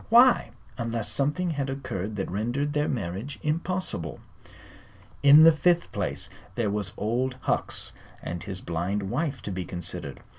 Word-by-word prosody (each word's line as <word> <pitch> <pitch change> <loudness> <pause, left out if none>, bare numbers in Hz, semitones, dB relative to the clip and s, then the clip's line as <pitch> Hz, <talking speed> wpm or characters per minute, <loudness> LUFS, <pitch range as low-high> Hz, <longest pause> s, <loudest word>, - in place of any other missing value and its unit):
Why 240 - +6 0.3
unless 115 -2 0
something 150 +8 +1
had 140 -3 -2
occurred 110 -7 -4
that 95 - -3
rendered 120 +9 -1
their 150 0 +1
marriage 110 +3 -3
impossible? 155 - -2 1.0
In 145 +2 +9
the 165 - +10
fifth 175 +2 +2
place - - -2 0.3
there 115 -4 0
was 100 -3 -2
Old 125 +4 0
Hucks - - 0 0.3
and 85 0 -5
his 95 -2 -6
blind 95 +4 -2
wife 135 -1 -2
to 105 - -4
be 90 -1 -3
considered. 85 -1 -3
120 Hz, 145 wpm, -27 LUFS, 100-150 Hz, 1.0 s, the